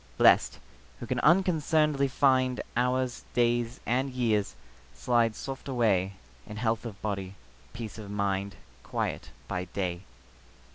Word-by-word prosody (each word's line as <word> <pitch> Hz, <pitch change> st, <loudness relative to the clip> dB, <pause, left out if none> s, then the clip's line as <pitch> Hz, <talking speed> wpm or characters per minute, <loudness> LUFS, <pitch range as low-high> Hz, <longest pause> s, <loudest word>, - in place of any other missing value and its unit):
Blest, -, -, +5 dB, 0.4 s
who -, -, -6 dB
can -, -, -1 dB
unconcern'dly 155 Hz, -5 st, +3 dB
find 130 Hz, -1 st, +2 dB
Hours, 125 Hz, 0 st, 0 dB
days, 120 Hz, 0 st, +1 dB
and 130 Hz, +3 st, +1 dB
years, 115 Hz, -6 st, 0 dB, 0.4 s
slide 115 Hz, -3 st, +2 dB
soft 135 Hz, +4 st, -6 dB
away 105 Hz, -7 st, +1 dB, 0.3 s
In 105 Hz, 0 st, -8 dB
health 115 Hz, 0 st, 0 dB
of 105 Hz, -3 st, -9 dB
body, 100 Hz, -2 st, -3 dB, 0.4 s
peace 115 Hz, -2 st, -7 dB
of 105 Hz, -2 st, -8 dB
mind, 100 Hz, -1 st, -1 dB, 0.3 s
Quiet -, -, -3 dB, 0.2 s
by 90 Hz, 0 st, -3 dB
day. 90 Hz, -1 st, -3 dB
120 Hz, 125 wpm, -29 LUFS, 100-130 Hz, 0.4 s, Blest